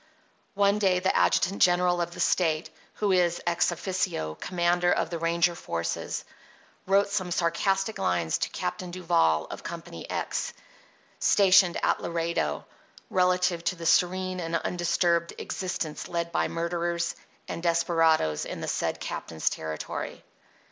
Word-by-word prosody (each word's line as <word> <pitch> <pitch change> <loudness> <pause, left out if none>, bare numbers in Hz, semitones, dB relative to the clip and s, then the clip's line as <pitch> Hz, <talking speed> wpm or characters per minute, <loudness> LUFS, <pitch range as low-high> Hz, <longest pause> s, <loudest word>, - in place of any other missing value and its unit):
One 200 +1 +3
day 190 -3 +3
the 185 +1 +1
adjutant 195 +3 +2
general 175 0 +4
of 175 0 -3
the - - -10
State, 160 -3 +1 0.2
who 205 -2 0
is, 175 -2 +2
ex 170 0 +2
offico, 165 - -2
commander 175 0 +1
of 165 - 0
the 170 - -3
ranger 170 +1 +2
forces, 85 - -3 0.6
wrote 200 +1 +3
some 195 -3 -1
sarcastic 195 +4 0
lines 85 -2 0
to - - -1
Captain 180 - -4
Duval 120 - +2
of - - -7
Company - - -8
X, - - -2 0.7
stationed 190 -3 +5
at - - +1
Laredo, 165 - -2 0.5
relative 180 -2 +2
to 185 - +1
the 170 -1 -8
serene 185 +2 +2
and 165 -1 -2
undisturbed 170 0 +1
existence 175 -4 -4
led 170 -1 -2
by - - +1
murderers 170 0 -2 0.3
and - - -5
desperadoes 165 - +2
in - - -6
the - - -4
said - - -1
captain's 80 -1 -2
territory. 80 -1 -5
175 Hz, 135 wpm, -27 LUFS, 165-185 Hz, 0.7 s, stationed